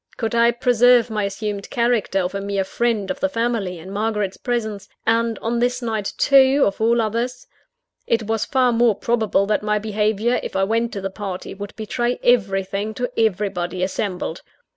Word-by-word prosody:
Could 225 -1 -2
I 235 0 +5
preserve 245 0 +4
my 210 -2 0
assumed 200 0 -4
character 235 -5 +1
of 180 +1 -3
a 200 - -3
mere 200 -1 -1
friend 225 +1 -1
of 280 - -5
the 285 - +1
family, 230 -7 -1
in 175 +4 -10
Margaret's 210 -1 -1
presence? 220 -5 -3 0.2
and 230 0 +1
on 235 +1 0
this 245 +1 +1
night 220 -4 -3
too, 275 0 +5
of 200 +2 -2
all 235 +1 +3
others? 235 +3 -2 0.6
It 230 -1 +1
was 220 0 -1
far 255 -2 +2
more 235 -2 +3
probable 220 -2 +1
that 210 +1 0
my 210 0 0
behaviour, 215 +2 0
if - - -7
I 190 - +2
went 230 +3 0
to 200 - -4
the 195 0 -3
party, 195 -2 -6
would 200 +1 -8
betray 240 +3 -2
everything 200 -2 +1
to 245 -1 -3
everybody 190 -4 0
assembled. 185 -2 -3
220 Hz, 180 wpm, -21 LUFS, 200-235 Hz, 0.6 s, I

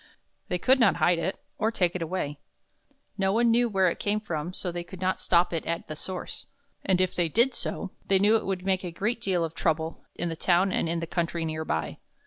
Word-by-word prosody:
They 180 - 0
could 260 +9 +4
not 225 -5 +5
hide 175 -1 +3
it 170 +3 -2 0.2
or 220 - +2
take 180 -6 +1
it 180 - -2
away. 155 -4 -3 0.8
No 190 0 +2
one 230 +2 +3
knew 240 +1 +4
just 220 - -9
where 190 -1 +5
it 170 - -1
came 210 +1 +1
from, 170 -5 -4
so 185 -1 -3
they 175 0 -4
could 175 +1 -11
not 185 0 0
stop 175 0 +3
it 165 - -1
at 170 0 -2
the 155 - -5
source; 185 +4 -6 0.4
and 190 -2 +2
if 185 -1 +1
they 175 -2 +1
did 235 - +3
so, 195 - -3 0.2
they 195 - +5
knew 205 +3 +4
that 225 - +5
it - - -9
would 190 -1 -2
make 190 -1 +1
a 180 - -3
great 210 +8 -2
deal 185 -6 +1
of 160 - -6
trouble 160 0 -1
in 175 - -1
the 165 - -3
town 180 +3 +3
and 165 - 0
in 170 0 -1
the - - -2
country 170 0 -1
near 155 0 -3
by. 80 - -2
180 Hz, 250 wpm, -27 LUFS, 165-195 Hz, 0.8 s, not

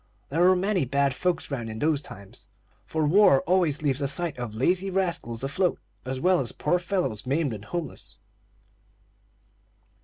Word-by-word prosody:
There 160 +5 0
were 185 +1 +6
many 190 -1 +1
bad 140 +1 +1
folks 175 +1 -1
'round 120 -5 -3
in 110 - -6
those 150 +3 +1
times; 100 -8 -12 0.4
for 160 -1 0
war 155 -4 +5
always 170 -4 +1
leaves 140 -1 +1
a 140 - +1
sight 170 +3 0
of 115 -3 -5
lazy 180 - +1
rascals 170 -11 -2
afloat, 170 +7 0 0.3
as 130 0 -3
well 180 +4 +3
as 125 - -2
poor 175 +5 0
fellows 170 - -2
maimed 140 -1 0
and 105 0 -8
homeless. 175 -2 -6
150 Hz, 160 wpm, -26 LUFS, 130-180 Hz, 0.4 s, were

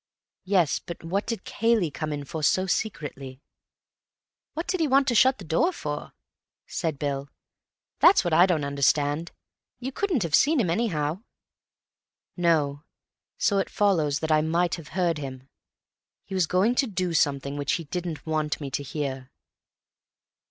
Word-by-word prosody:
"Yes, 185 -6 +2
but 170 - -9
what 190 +5 -2
did 230 -4 -3
Cayley 225 -7 +1
come 155 +1 -4
in 145 -1 -4
for 160 +3 -5
so 185 +5 +2
secretly?" 145 -10 -3 1.2
"What 325 +2 -3
did 370 - -1
he 320 - +2
want 275 0 +3
to - - +1
shut 260 +3 +5
the 195 - -10
door 165 - +2
for?" 150 - -5 0.5
said 160 -4 -3
Bill. 140 -1 -3 0.7
"That's - - +6
what 175 -3 -1
I 175 +4 +6
don't 165 -5 +1
understand. 145 +3 +1 0.5
You 255 +2 -5
couldn't 335 - 0
have 165 -3 -4
seen 300 - +4
him, 185 -8 +1
anyhow." 170 -4 -1 1.1
"No. 150 -5 +1 0.5
So 200 -2 +2
it 195 - -1
follows 160 -8 +1
that 160 0 -1
I 155 0 +4
might 170 +2 +1
have 165 -3 -5
heard 170 -4 +1
him. 130 -2 -7 0.8
He 195 - -10
was 185 -4 +2
going 190 +8 +2
to 270 - -3
do 185 -4 -2
something 140 -2 +1
which 145 -1 -1
he 170 - -1
didn't 170 0 -5
want 155 -2 -1
me 140 -3 -6
to 145 - -2
hear." 135 -2 -4
165 Hz, 160 wpm, -26 LUFS, 145-195 Hz, 1.2 s, That's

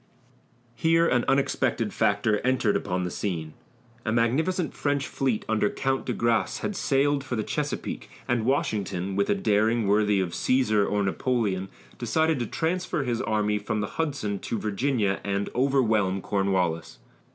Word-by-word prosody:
Here 165 +7 +3
an 120 -5 +2
unexpected 135 0 +1
factor 105 +1 +2
entered 125 -5 +1
upon 90 -2 -1
the 90 - -3
scene. 80 -6 -3 0.5
A 110 - -1
magnificent 150 +10 +1
French 145 -1 -1
fleet 130 -3 -1
under 110 -2 +2
Count 135 0 -1
de 125 - 0
Grasse 115 -1 0
had 205 - -2
sailed 140 -2 +1
for 130 - -3
the 110 - -1
Chesapeake, - - -3 0.2
and 120 -2 +1
Washington, 100 -7 -1
with 100 0 +1
a - - +3
daring 110 +3 +2
worthy 105 0 +3
of 95 -2 0
Cæsar 110 -5 +2
or 105 0 +1
Napoleon, 100 -2 -1 0.3
decided 160 +5 +1
to 120 - -2
transfer 170 0 -1
his 120 -3 -1
army 105 -1 0
from 105 - -2
the 105 +10 -2
Hudson 120 -11 -2
to 115 - -3
Virginia 105 -1 0
and 100 0 -2
overwhelm 115 -7 +2
Cornwallis. 90 -6 -1
110 Hz, 150 wpm, -26 LUFS, 100-135 Hz, 0.5 s, Here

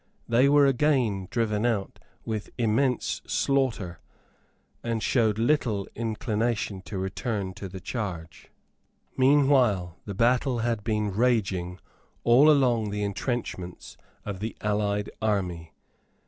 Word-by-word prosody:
They 125 +4 +4
were 145 0 +6
again 125 -8 +1
driven 110 -3 0
out 110 -5 -1 0.3
with 110 -2 -4
immense 125 +2 +1
slaughter, 115 - 0 0.8
and 115 -2 -2
showed 110 -4 +2
little 115 -5 +1
inclination 110 -2 -2
to 100 - -5
return 95 +1 -3
to 95 +1 -7
the 95 +1 -8
charge. 90 -7 -6 0.7
Meanwhile 130 - +3
the 100 - -6
battle 125 +3 +2
had 115 -2 -1
been 105 -2 0
raging 95 -7 +1 0.5
all 125 +6 +6
along 125 -7 +3
the 105 0 -2
entrenchments 100 -3 -4 0.3
of 100 -2 -5
the 110 +3 -5
allied 105 -1 -1
army. 90 -7 -1
110 Hz, 115 wpm, -26 LUFS, 100-120 Hz, 0.8 s, were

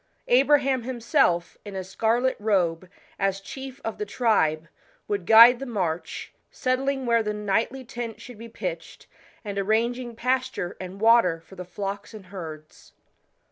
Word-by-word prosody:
Abraham 275 0 +4
himself, 225 -8 0
in 205 -2 -8
a 190 - -3
scarlet 230 +7 0
robe, 185 -5 0 0.3
as 195 0 0
chief 265 +6 -9
of 225 - -4
the 210 - -2
i,nbe, 180 -8 +1 0.4
would 200 -4 -3
guide 235 +2 +9
the 270 - -6
march, 180 -8 -3 0.2
settling 265 +1 -1
where 235 -1 +3
the 210 -1 -2
nightly 220 +6 -1
tent 230 -2 -6
should 230 -1 -11
be 230 0 -9
pitched, - - -6 0.4
and 200 -1 -3
arranging 235 +4 0
pasture 250 -7 -1
and 185 +1 -8
water 225 -7 +4
for 165 +4 -18
the 180 -1 -7
flocks 200 +4 -6
and 205 -3 -11
herds. 160 -5 -10
220 Hz, 145 wpm, -25 LUFS, 190-245 Hz, 0.4 s, guide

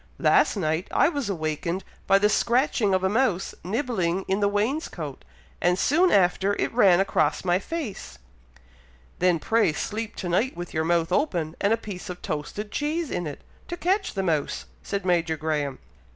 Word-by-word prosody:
"Last - - +4
night 160 0 -1
I - - +3
was 285 -9 -3
awakened 170 +1 -2 0.2
by 195 - +6
the 205 +1 +4
scratching 235 -2 +2
of 185 - 0
a - - +3
mouse 205 -3 +1
nibbling 195 - -1
in 190 +1 +1
the 205 - +3
wainscoat, 205 - -2 0.4
and 180 +1 +3
soon 340 - +3
after 195 +1 +3
it - - -1
ran 195 -7 +5
across 155 -5 +1
my 175 0 +3
face." 225 - -6 1.0
"Then 180 -1 +3
pray 220 0 +2
sleep 220 +7 -4
to 185 - -5
night 190 +8 0
with 175 0 -6
your 160 0 0
mouth 170 0 +1
open, 175 - 0
and 200 - +2
a 225 - +4
piece 200 -6 -8
of 180 0 -7
toasted 180 +8 -4
cheese 305 +1 -2
in 175 - -2
it, 145 - -7 0.3
to 345 - -5
catch 385 - 0
the 195 - -1
mouse," 155 -5 -1 0.2
said 200 -1 -4
Major 170 -3 +1
Graham. 150 -3 -2
190 Hz, 175 wpm, -25 LUFS, 170-225 Hz, 1.0 s, by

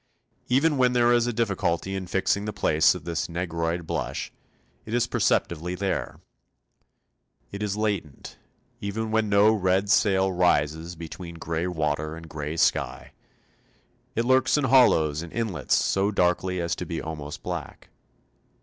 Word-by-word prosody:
Even 145 +4 +2
when 125 -1 +3
there 120 0 +4
is 120 0 +3
a - - 0
difficulty 95 -5 -1
in 95 -1 -4
fixing 95 +3 0
the 105 - -2
place 80 -5 +3
of 90 - -8
this 85 0 -3
negroid 85 -1 -2
blush, - - -4 0.5
it 110 - -4
is 120 -1 +2
perceptibly 90 -7 0
there. 95 +1 -3 1.3
It 100 - -6
is 105 -1 -2
latent, 100 -9 -3 0.4
even 110 +1 -3
when 110 -1 +1
no 100 +2 +5
red 95 -1 +1
sail 95 -2 +3
rises 85 -1 +1
between 85 +1 -8
grey 85 +1 -3
water 75 -2 -2
and 80 0 -10
grey 75 +1 -5
sky; - - 0 1.0
it 115 - 0
lurks 130 +3 +3
in 150 - 0
hollows 80 - +4
and 85 -1 -8
inlets 110 -10 -1
so 95 +1 +1
darkly 90 -1 +1
as 85 -1 -1
to - - -4
be - - -3
almost 75 -2 -7
black. - - -6
95 Hz, 150 wpm, -25 LUFS, 85-110 Hz, 1.3 s, no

